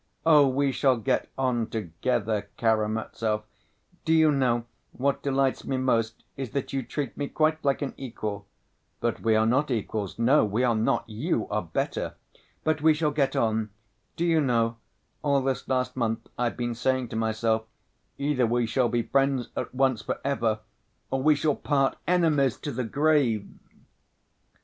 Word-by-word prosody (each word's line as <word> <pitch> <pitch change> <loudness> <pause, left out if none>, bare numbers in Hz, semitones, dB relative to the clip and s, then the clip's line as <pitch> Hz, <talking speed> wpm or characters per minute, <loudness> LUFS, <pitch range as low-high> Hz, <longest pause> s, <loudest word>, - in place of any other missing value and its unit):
Oh, 150 -3 +7
we 135 +1 +1
shall 130 -1 +2
get 125 +3 0
on 125 -4 0
together, 105 +1 -2
Karamazov! 110 -1 0 0.6
Do 160 - +2
you 160 -1 +5
know, 125 -4 +1 0.3
what 140 +2 0
delights 135 -1 +1
me 135 - -2
most, 115 -3 0
is 135 -3 -4
that 140 -1 -3
you 135 - 0
treat 130 +2 -4
me 145 - -3
quite 155 +1 +1
like 140 0 +1
an 135 - -3
equal. 110 -6 -5 0.5
But 120 -1 -1
we 110 -1 +3
are 110 0 +3
not 130 +6 +2
equals, 110 -4 -2
no, 125 +5 +4
we 110 +4 0
are 120 -2 +3
not, 110 0 0
you 115 +3 -1
are 105 0 0
better! 85 -4 -3 0.5
But 155 -1 +1
we 155 0 +5
shall 150 -1 +1
get 140 -2 0
on. 110 -1 +1 0.5
Do 170 - -1
you 165 -2 +3
know, 115 -4 +1 0.4
all 140 -2 +2
this 135 -1 -2
last 125 -1 0
month, 115 -2 -1
I've 120 -1 -1
been 120 -1 -1
saying 125 +1 0
to - - -6
myself, 110 0 0 0.5
'Either 140 -4 +1
we 120 +1 +1
shall 120 +2 +1
be 120 0 0
friends 135 -2 +1
at - - -3
once, 130 -3 +1
for - - -3
ever, 115 -6 0 0.5
or 135 - 0
we 150 +2 +5
shall 145 0 +1
part 135 -2 +1
enemies 155 -8 +3
to 145 - -3
the 125 -1 -3
grave! 135 -5 +2
125 Hz, 170 wpm, -27 LUFS, 115-140 Hz, 0.6 s, Oh